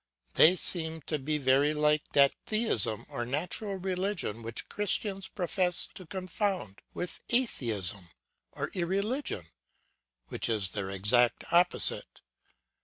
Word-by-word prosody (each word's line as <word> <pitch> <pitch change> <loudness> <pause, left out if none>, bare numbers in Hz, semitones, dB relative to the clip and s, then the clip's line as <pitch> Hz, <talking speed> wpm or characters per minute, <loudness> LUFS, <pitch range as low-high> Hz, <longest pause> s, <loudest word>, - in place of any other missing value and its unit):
They 175 +4 +7
seem 160 -2 0
to 155 +1 -2
be 150 +3 -1
very 140 +2 +3
like 150 0 +1
that 140 -1 +6
theism 120 - 0
or 120 - -4
natural 170 - -2
religion, 185 - -2
which 115 0 -7
Christians 200 -1 -1
profess 180 -1 0
to 185 - -11
confound 185 - -3 0.2
with 180 - -3
atheism 110 - 0 0.4
or - - -4
irreligion 195 - -1 0.8
which - - -2
is 105 -4 +1
their 95 0 -4
exact 105 +6 +2
opposite. 175 +1 +3
160 Hz, 115 wpm, -30 LUFS, 120-190 Hz, 0.8 s, They